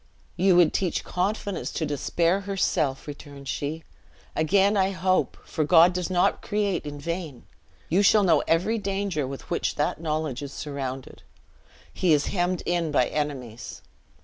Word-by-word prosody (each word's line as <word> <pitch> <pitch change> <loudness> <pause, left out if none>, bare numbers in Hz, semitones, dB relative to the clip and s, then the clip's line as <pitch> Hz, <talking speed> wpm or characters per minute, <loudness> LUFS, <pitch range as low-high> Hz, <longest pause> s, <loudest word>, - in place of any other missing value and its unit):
"You 185 +1 +4
would 175 -3 +5
teach 180 -4 -1
confidence 200 +2 -2
to 160 - -1
Despair 165 +5 +1
herself," 185 -8 -1
returned 145 -1 -10
she; 145 +5 -3 0.5
"again 195 +6 +3
I 190 -1 +3
hope; 185 0 0
for 155 - -1
God 170 +3 +6
does 180 0 -2
not 180 -1 +2
create 205 -7 -1
in 145 0 -6
vain! 165 -4 -5 0.4
You 180 +5 +3
shall 205 +1 +5
know 175 -4 +4
every 185 +8 +2
danger 195 -7 -2
with 135 0 -8
which - - -1
that 150 +2 -1
knowledge 155 -5 -2
is 140 -1 -7
surrounded. 135 -3 -6 0.7
He 180 -4 +2
is 145 -2 +2
hemmed 180 -1 0
in 175 -2 0
by 130 -4 +2
enemies. 130 -6 -5
165 Hz, 150 wpm, -25 LUFS, 145-190 Hz, 0.7 s, God